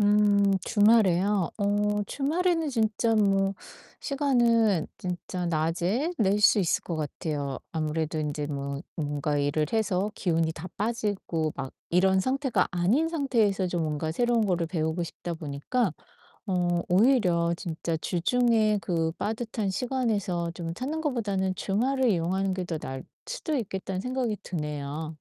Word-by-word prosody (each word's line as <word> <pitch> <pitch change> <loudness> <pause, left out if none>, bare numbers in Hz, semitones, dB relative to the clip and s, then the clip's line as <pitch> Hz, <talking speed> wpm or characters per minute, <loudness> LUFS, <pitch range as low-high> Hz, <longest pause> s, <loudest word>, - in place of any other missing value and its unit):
음 205 -1 +4
주말에요? 205 -4 +3
어 205 0 +1
주말에는 325 +3 0
진짜 225 -2 +1
뭐 195 -2 +2 0.5
시간은 235 - +2
진짜 180 0 -4
낮에 175 - 0
낼 205 -1 +3
수 210 0 +6
있을 175 - +1
것 170 - -3
같아요. 145 -2 -3
아무래도 160 0 -1
인제 150 -1 -2
뭐 140 -1 -4
뭔가 145 -1 -1
일을 145 +2 +1
해서 210 -2 0
기운이 165 -3 0
다 165 +3 -8
빠지고 205 -8 -1
막 135 -1 -5 0.2
이런 190 +2 +4
상태가 260 -4 +1
아닌 200 - +2
상태에서 230 - +1
좀 175 -2 -1
뭔가 155 0 -2
새로운 235 +3 +2
거를 175 -3 +1
배우고 160 0 -1
싶다 170 0 -5
보니까 160 - -1 0.6
어 175 -2 +1
오히려 180 -5 +3
진짜 165 -2 -3
주중에 215 +4 +2
그 165 -4 0
빠듯한 220 +2 -3
시간에서 205 -6 -1
좀 165 -1 -4
찾는 295 - -3
것보다는 205 -10 -1
주말을 255 +7 +1
이용하는 190 +1 +1
게 185 -1 -3
더 165 -3 -3
나을 130 -2 -6 0.2
수도 475 -11 -3
있겠다는 190 -5 -3
생각이 250 -3 -1
드네요. 150 -3 -4
190 Hz, 295 characters per minute, -27 LUFS, 165-225 Hz, 0.6 s, 수